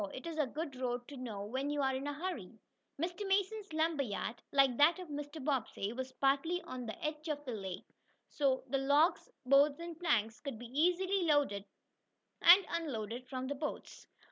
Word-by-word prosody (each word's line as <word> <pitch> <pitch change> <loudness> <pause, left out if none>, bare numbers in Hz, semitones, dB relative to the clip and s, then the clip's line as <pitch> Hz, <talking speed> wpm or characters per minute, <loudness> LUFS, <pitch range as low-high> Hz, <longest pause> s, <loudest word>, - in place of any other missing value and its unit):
It 260 - -8
is 330 -2 -4
a 295 - +2
good 295 +2 -5
road 245 -1 -2
to 285 - -8
know 230 -6 -5
when 260 +6 -2
you 290 -1 0
are 265 0 +2
in 265 +2 -3
a 290 - -2
hurry." 280 - -5 0.4
Mr. 350 +5 -2
Mason's 400 +1 0
lumber 315 -1 +1
yard, 225 -1 -3
like 270 -3 +4
that 315 +5 +6
of 365 -3 -8
Mr. 290 +1 -5
Bobbsey, 235 -6 -1
was 260 +1 -5
partly 280 +7 +1
on 255 -7 -6
the 220 - -6
edge 305 +1 -3
of 295 -1 -3
the 250 - -3
lake, 190 -4 -5 0.4
so 270 -3 +1
the 275 +1 +1
logs, 290 +6 +3 0.2
boards 280 +3 +5
and 335 -1 -7
planks 225 -10 +1
could 275 -6 -5
be 240 - -9
easily 360 +9 +2
loaded 285 -10 +2 0.8
and 360 +3 +9
unloaded 255 -7 -3
from 255 -1 -3
boats. 285 +3 -5
285 Hz, 185 wpm, -34 LUFS, 255-325 Hz, 0.8 s, and